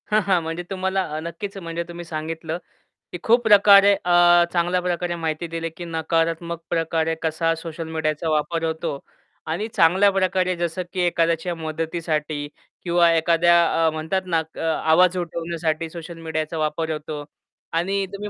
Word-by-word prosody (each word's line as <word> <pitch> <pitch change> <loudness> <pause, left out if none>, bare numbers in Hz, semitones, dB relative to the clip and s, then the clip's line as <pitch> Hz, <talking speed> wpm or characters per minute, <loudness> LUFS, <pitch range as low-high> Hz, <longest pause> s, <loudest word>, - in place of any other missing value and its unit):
हां, 215 0 +3
हां. 190 -3 +2
म्हणजे 165 +2 -4
तुम्हाला 190 0 -1
अ, - - -2
नक्कीच 170 +5 -6
म्हणजे 170 -2 -4
तुम्ही 175 0 -8
सांगितलं 160 0 -4 0.5
की - - -5
खूप 235 +2 +4
प्रकारे 200 -1 +7
अ, 175 -2 +5
चांगल्या 175 +1 +1
प्रकारे 175 -1 -2
माहिती 165 0 -3
दिली 165 0 -4
की 175 - -6
नकारात्मक 165 +1 -1
प्रकारे 165 -1 0
कसा 165 +1 +1
सोशल 165 0 -6
मीडियाचा 160 0 -2
वापर 160 +2 0
होतो 160 -3 -2 0.5
आणि 205 +7 -2
चांगल्या 190 0 +4
प्रकारे 185 -1 +1
जसं 175 +1 -2
की 185 - -3
एखाद्याच्या 170 0 +1
मदतीसाठी 155 -2 -3 0.4
किंवा 170 -1 +4
एखाद्या 165 +1 +4 0.3
अ, - - +5
म्हणतात 160 +5 -2
ना, 170 -3 +1 0.2
अ, - - -9
आवाज 165 +3 +3
उठवण्यासाठी 165 -2 -3
सोशल 170 +1 -9
मीडियाचा 160 0 -3
वापर 155 +1 -1
होतो 150 -1 -5 0.5
आणि 195 +4 0
तुम्ही 205 +1 -5
170 Hz, 150 wpm, -22 LUFS, 160-180 Hz, 0.5 s, प्रकारे